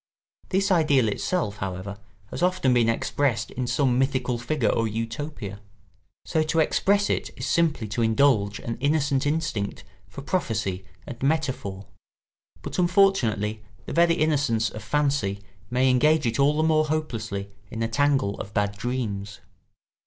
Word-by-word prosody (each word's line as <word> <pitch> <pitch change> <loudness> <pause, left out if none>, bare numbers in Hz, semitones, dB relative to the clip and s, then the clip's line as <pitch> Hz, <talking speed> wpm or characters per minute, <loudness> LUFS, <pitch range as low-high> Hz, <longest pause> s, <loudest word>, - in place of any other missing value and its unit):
This 195 +1 +1
ideal 145 -9 +4
itself, 105 - -2
however, 95 +1 -5 0.3
has - - -5
often 180 -8 +2
been 120 -2 +3
expressed 120 +2 0
in 125 0 -3
some 130 -2 +2
mythical 130 -2 0
figure 125 +1 0
or 115 - +1
Utopia. 115 -1 -5 0.7
So 160 - +1
to 155 +1 -1
express 200 +6 +2
it - - -1
is - - -4
simply 160 -9 +1
to 105 +3 -2
indulge 110 -3 +3
an 115 - -5
innocent 145 0 +1
instinct 150 -10 -2 0.2
for 135 +8 -9
prophecy 110 - -2 0.2
and 120 - -9
metaphor; 130 -10 -1 0.8
but - - -4
unfortunately 175 - +2 0.2
the - - -6
very 170 0 +4
innocence 140 -8 +1
of 110 - -8
fancy 140 -7 0 0.3
may 130 +1 +2
engage 150 +4 +3
it 115 +1 -1
all 145 +2 +3
the 155 - +2
more 155 -1 +3
hopelessly 115 -10 -3 0.2
in 115 - -3
a - - +1
tangle 130 -4 +1
of 105 - -8
bad 100 0 0
dreams. 105 -4 -3
130 Hz, 145 wpm, -25 LUFS, 110-155 Hz, 0.8 s, ideal